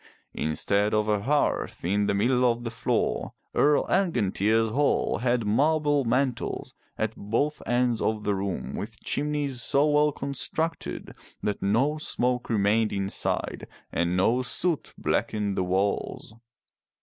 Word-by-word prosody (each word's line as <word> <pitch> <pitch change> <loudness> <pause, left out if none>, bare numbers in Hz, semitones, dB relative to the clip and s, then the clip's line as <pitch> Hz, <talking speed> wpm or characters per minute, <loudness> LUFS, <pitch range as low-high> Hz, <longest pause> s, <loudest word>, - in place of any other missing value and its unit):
Instead 100 +7 0
of 105 0 +1
a 105 -1 +1
hearth 145 - 0
in 100 +3 +1
the - - +1
middle 125 +5 +2
of 120 -1 +2
the 115 - -4
floor, 115 - -1 0.2
Earl 150 0 +3
Angantyr's 115 - +1
hall 140 -2 +1
had 120 -1 +1
marble 145 +5 +2
mantles 125 +1 -1 0.2
at - - -1
both 120 +9 -1
ends 120 -1 +1
of 110 -1 0
the 105 - +1
room 95 -1 -3
with 110 +2 -6
chimneys 145 -3 -1
so 140 +5 +3
well 150 0 +3
constructed 145 +4 -3 0.3
that 105 -1 -1
no 130 +10 +1
smoke 125 -4 -1
remained 110 0 +2
inside, 100 0 -2 0.2
and 85 +1 0
no 115 +7 +3
soot 160 +5 -1
blackened 105 -2 -1
the 95 - 0
walls. 95 +3 -1
115 Hz, 135 wpm, -26 LUFS, 105-140 Hz, 0.3 s, Earl